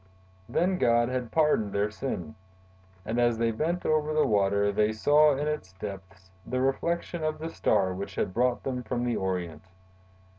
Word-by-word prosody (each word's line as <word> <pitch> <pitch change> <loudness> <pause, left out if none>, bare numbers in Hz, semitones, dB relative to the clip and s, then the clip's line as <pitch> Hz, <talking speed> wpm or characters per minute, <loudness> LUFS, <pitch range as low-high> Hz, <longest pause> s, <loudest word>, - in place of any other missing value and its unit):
Then 185 +1 +1
God 120 0 +3
had 125 -3 -3
pardoned 150 -10 +2
their 105 +1 0
sin. 90 - -5 0.7
And, 115 +3 -1
as 120 -1 +3
they 115 0 +1
bent 165 +10 -2
over 155 0 +1
the 155 - +4
water, 100 0 +2
they 105 +2 +1
saw 150 +6 +4
in 145 +2 -2
its 150 -12 -4
depths 95 -1 -9
the 130 +6 -3
reflection 170 +5 -1
of 155 0 -1
the 160 +1 -5
Star 95 -10 +1
which 95 +2 -6
had 95 - -1
brought 125 +2 +1
them 125 -2 -3
from 120 +1 -3
the 120 - 0
Orient. 90 -5 -3
120 Hz, 175 wpm, -28 LUFS, 100-150 Hz, 0.7 s, the